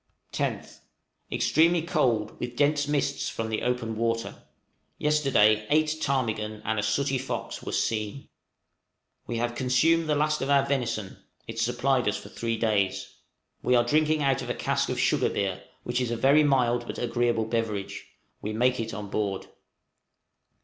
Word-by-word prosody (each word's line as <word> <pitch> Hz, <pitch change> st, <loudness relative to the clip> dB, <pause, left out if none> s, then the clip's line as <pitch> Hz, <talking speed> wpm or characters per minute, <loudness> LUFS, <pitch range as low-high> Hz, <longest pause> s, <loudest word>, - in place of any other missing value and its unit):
10th. -, -, -3 dB, 0.5 s
Extremely 165 Hz, +2 st, +3 dB
cold, 120 Hz, -11 st, +1 dB
with 120 Hz, 0 st, -5 dB
dense 145 Hz, +1 st, +2 dB
mists 140 Hz, -1 st, 0 dB
from 115 Hz, 0 st, -4 dB
the 110 Hz, -, -2 dB
open 125 Hz, -2 st, -1 dB
water. 115 Hz, 0 st, -2 dB, 0.5 s
Yesterday 130 Hz, -8 st, +3 dB
eight 155 Hz, 0 st, +2 dB
ptarmigan 110 Hz, -5 st, -1 dB
and 110 Hz, 0 st, 0 dB
a -, -, +1 dB
sooty 135 Hz, +6 st, 0 dB
fox 130 Hz, -, -5 dB
were -, -, -6 dB
seen. 110 Hz, +4 st, -2 dB, 1.0 s
We 120 Hz, -, -3 dB
have 120 Hz, +1 st, -1 dB
consumed 155 Hz, +6 st, +2 dB
the 150 Hz, -, +3 dB
last 150 Hz, +1 st, +1 dB
of 135 Hz, -, -2 dB
our 140 Hz, -1 st, +4 dB
venison; 115 Hz, -8 st, -2 dB, 0.3 s
it 115 Hz, 0 st, -6 dB
supplied 125 Hz, +2 st, +1 dB
us 105 Hz, -, +1 dB
for -, -, -10 dB
three 115 Hz, -1 st, -3 dB
days. 105 Hz, -4 st, 0 dB, 0.5 s
We 125 Hz, -, +2 dB
are 120 Hz, -, +5 dB
drinking 155 Hz, +4 st, +2 dB
out 135 Hz, -2 st, +2 dB
a -, -, -3 dB
cask -, -, 0 dB
of -, -, -2 dB
sugar -, -, +2 dB
beer, 95 Hz, -2 st, -2 dB, 0.2 s
which 120 Hz, +1 st, -1 dB
is 125 Hz, -, -1 dB
a 120 Hz, -, -2 dB
very 140 Hz, +6 st, +5 dB
mild 120 Hz, -4 st, +2 dB
but -, -, -5 dB
agreeable 120 Hz, -2 st, 0 dB
beverage; 110 Hz, -3 st, -3 dB, 0.3 s
we 105 Hz, -, -4 dB
make 125 Hz, +3 st, +2 dB
it 115 Hz, -2 st, -3 dB
on 105 Hz, 0 st, -6 dB
board. 100 Hz, -1 st, -2 dB
120 Hz, 160 wpm, -27 LUFS, 110-140 Hz, 1.0 s, are